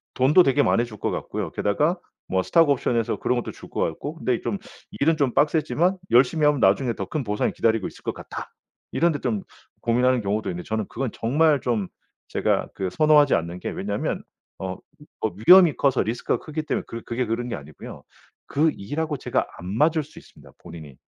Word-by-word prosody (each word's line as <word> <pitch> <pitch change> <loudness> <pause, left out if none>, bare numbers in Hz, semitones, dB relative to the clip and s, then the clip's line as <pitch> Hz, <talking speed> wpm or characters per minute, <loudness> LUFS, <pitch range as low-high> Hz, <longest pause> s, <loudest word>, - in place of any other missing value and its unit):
돈도 140 +8 +5
되게 145 -3 +3
많아 115 - +3
줄 110 -3 -11
것 - - -2
같고요. - - -4
게다가 150 - 0 0.3
뭐 95 0 0
스톡옵션에서 130 - +2
그런 125 - 0
것도 120 - -3
줄 - - -13
것 - - -3
같고 140 - -3
근데 125 -7 -1
좀 200 - -2 0.4
일은 160 +2 +3
좀 140 -5 0
빡세지만 160 +4 +2
열심히 135 +5 +4
하면 150 -2 +2
나중에 115 +4 +3
더 - - -5
큰 155 -3 -3
보상이 105 -2 -1
기다리고 110 -3 +1
있을 - - -13
것 - - -4
같아. - - -8 0.4
이런 170 0 +2
데 145 - -3
좀 110 -7 -2 0.4
고민하는 125 +1 +2
경우도 105 +1 -1
있는데 90 0 -5
저는 110 -1 -1
그건 130 -1 -3
정말 145 +4 +2
좀 110 -7 -1 0.4
제가 - - 0
그 95 -1 -3
선호하지 150 +5 +5
않는 85 +2 -3
게 - - -4
왜냐하면 100 +1 -3 0.3
어 95 -1 -5 0.4
어 110 - +1 0.2
위험이 180 -4 +8
커서 135 -2 +2
리스크가 115 +2 -1
크기 155 0 -4
때문에 - - -2
그 115 0 -7
그게 120 +2 -2
그런 120 +2 -2
게 - - -2
아니고요. 70 +1 -10 0.5
그 155 +3 +2
일 125 +11 -5
하고 155 -2 -1
제가 - - -1
안 90 - -8
맞을 155 +3 +3
수 145 - -19
있습니다 - - -15
본인이. 80 -5 -10
125 Hz, 395 characters per minute, -24 LUFS, 105-150 Hz, 0.5 s, 위험이